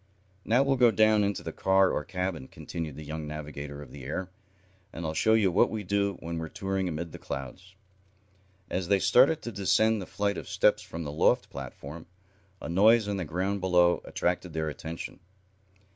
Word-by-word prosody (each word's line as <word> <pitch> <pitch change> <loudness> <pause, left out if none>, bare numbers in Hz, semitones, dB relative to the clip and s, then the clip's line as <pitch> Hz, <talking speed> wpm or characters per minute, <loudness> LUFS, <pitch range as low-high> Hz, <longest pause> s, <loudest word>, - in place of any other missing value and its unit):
"Now 120 +5 +3
we'll 135 -1 +1
go 120 -1 +6
down 110 0 +4
into 100 0 -1
the - - -4
car 95 0 +3
or - - -1
cabin," 90 -7 -3
continued 80 -4 -6
the 75 +1 -9
young 80 0 -5
navigator 75 -1 -7
of 65 - -14
the 70 -2 -10
air, 95 +7 -4 0.6
"and 85 - -6
I'll 80 - -2
show 110 +8 +3
you 100 -4 +3
what 90 - +4
we 110 -1 -4
do 100 0 0
when 85 0 -4
we're 80 -1 -5
touring 95 -1 -2
amid 85 +1 -4
the - - -9
clouds." 90 +9 -7 0.9
As 90 -1 -2
they 100 +1 +4
started 135 +10 +4
to 120 - -4
descend 105 +2 +2
the 95 - -7
flight 100 -1 -1
of - - -10
steps - - +3
from 85 0 -7
the 75 - -5
loft 75 - +2
platform, 75 +4 -8 0.5
a - - -7
noise 105 +6 +5
on 100 -1 -1
the 95 - -3
ground 95 +5 -2
below 90 -1 +3
attracted 90 -1 -2
their 80 -1 -1
attention. 80 +4 -7
90 Hz, 190 wpm, -28 LUFS, 80-100 Hz, 0.9 s, go